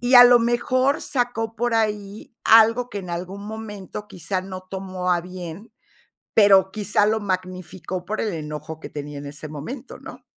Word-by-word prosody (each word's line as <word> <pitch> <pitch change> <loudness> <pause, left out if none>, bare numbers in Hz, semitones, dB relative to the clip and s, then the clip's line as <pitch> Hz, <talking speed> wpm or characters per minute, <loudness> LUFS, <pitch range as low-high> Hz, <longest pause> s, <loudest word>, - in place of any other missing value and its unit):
y 245 +2 +2
a 245 0 +12
lo 245 0 +8
mejor 255 +4 +1
sacó 240 -5 -1
por 240 0 0
ahí 210 -1 -2
algo 230 +2 +6
que 205 - -4
en 180 -2 -7
algún 185 +4 -5
momento 210 -2 -7
quizá 185 +1 -3
no 185 0 -7
tomó 185 -1 -3
a 175 - +2
bien, 180 +4 -9 0.6
pero 195 -3 +6
quizá 210 -1 +2
lo 220 +1 +1
magnificó 185 -2 -4
por 215 +2 -2
el 215 -4 -1
enojo 155 0 -6
que - - -7
tenía 145 -1 -7
en 145 - -8
ese 145 +2 -7
momento, 230 - -7
¿no? - - -11
200 Hz, 175 wpm, -23 LUFS, 180-225 Hz, 0.6 s, a